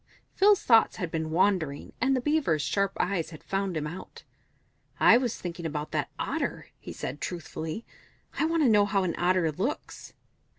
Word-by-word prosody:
Phil's 405 0 +4
thoughts 225 -2 +5
had 180 -5 -4
been 160 -1 -2
wandering, 165 -4 0
and 265 +2 +3
the 255 - 0
Beaver's 275 - +1
sharp 195 +4 0
eyes 180 -3 0
had 155 -3 -12
found 195 -3 -2
him 150 - -2
out. 170 +5 -8 0.8
"I - - +7
was 245 -3 -1
thinking 175 -1 -6
about 150 -1 -4
that - - -1
Otter," - - -3
he - - -9
said, 145 - -6
truthfully. 170 +2 -5 0.5
"I - - +3
want 330 0 +1
to - - +5
know 210 -3 +5
how 195 -1 +1
an 175 -3 -1
Otter 175 -2 +2
looks." 200 - -4
185 Hz, 175 wpm, -28 LUFS, 160-230 Hz, 0.8 s, I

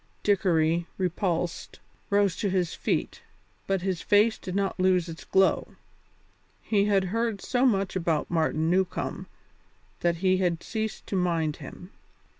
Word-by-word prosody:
Dickory, 170 -4 +2
repulsed, 175 -2 -2 0.3
rose 200 -2 +2
to 205 - -1
his 185 -2 0
feet, - - -2 0.5
but 195 -2 0
his 185 -3 -1
face 210 +2 +3
did 185 - -6
not 195 -1 -1
lose 185 -2 +3
its 165 -1 -8
glow. 190 0 +2 0.9
He 205 -2 +2
had 200 -2 +3
heard 230 -2 0
so 255 +6 +1
much 195 -5 0
about 165 -4 -1
Martin 160 -1 +1
Newcombe 185 +1 -1 0.7
that 170 -1 +1
he 185 +2 +2
had 175 -3 0
ceased 220 -1 -4
to - - -4
mind 165 -4 0
him. 180 +6 -11
185 Hz, 140 wpm, -27 LUFS, 170-200 Hz, 0.9 s, face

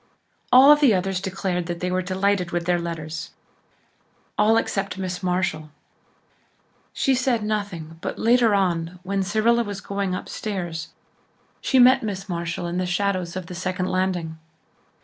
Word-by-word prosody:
All 270 +4 +9
the 285 -8 +4
others 185 0 -1
declared 185 -2 -2
that 170 -1 -4
they 180 +1 -2
were 185 0 +1
delighted 190 0 0
with 175 0 -2
their 175 0 +2
letters 165 -1 -5 1.1
all 215 +2 +4
except 195 -3 -1
Miss 185 -1 -4
Marshall. 180 -4 -1 1.2
She 270 - +1
said 250 -3 +1
nothing 185 -7 -4
but - - -4
later 230 -2 +4
on, 175 -2 0
when 195 +1 -1
Cyrilla 220 +4 +2
was 205 -3 -5
going 195 -1 -2
upstairs, 175 -5 -4 0.7
she 265 - +1
met 255 +1 +7
Miss 195 -3 -4
Marshall 170 -1 -3
in 175 +1 -2
the 185 - -1
shadows 180 -1 -1
of 185 -1 -4
the 180 - -9
second 185 +1 -2
landing. 180 -4 -1
185 Hz, 150 wpm, -23 LUFS, 175-205 Hz, 1.2 s, All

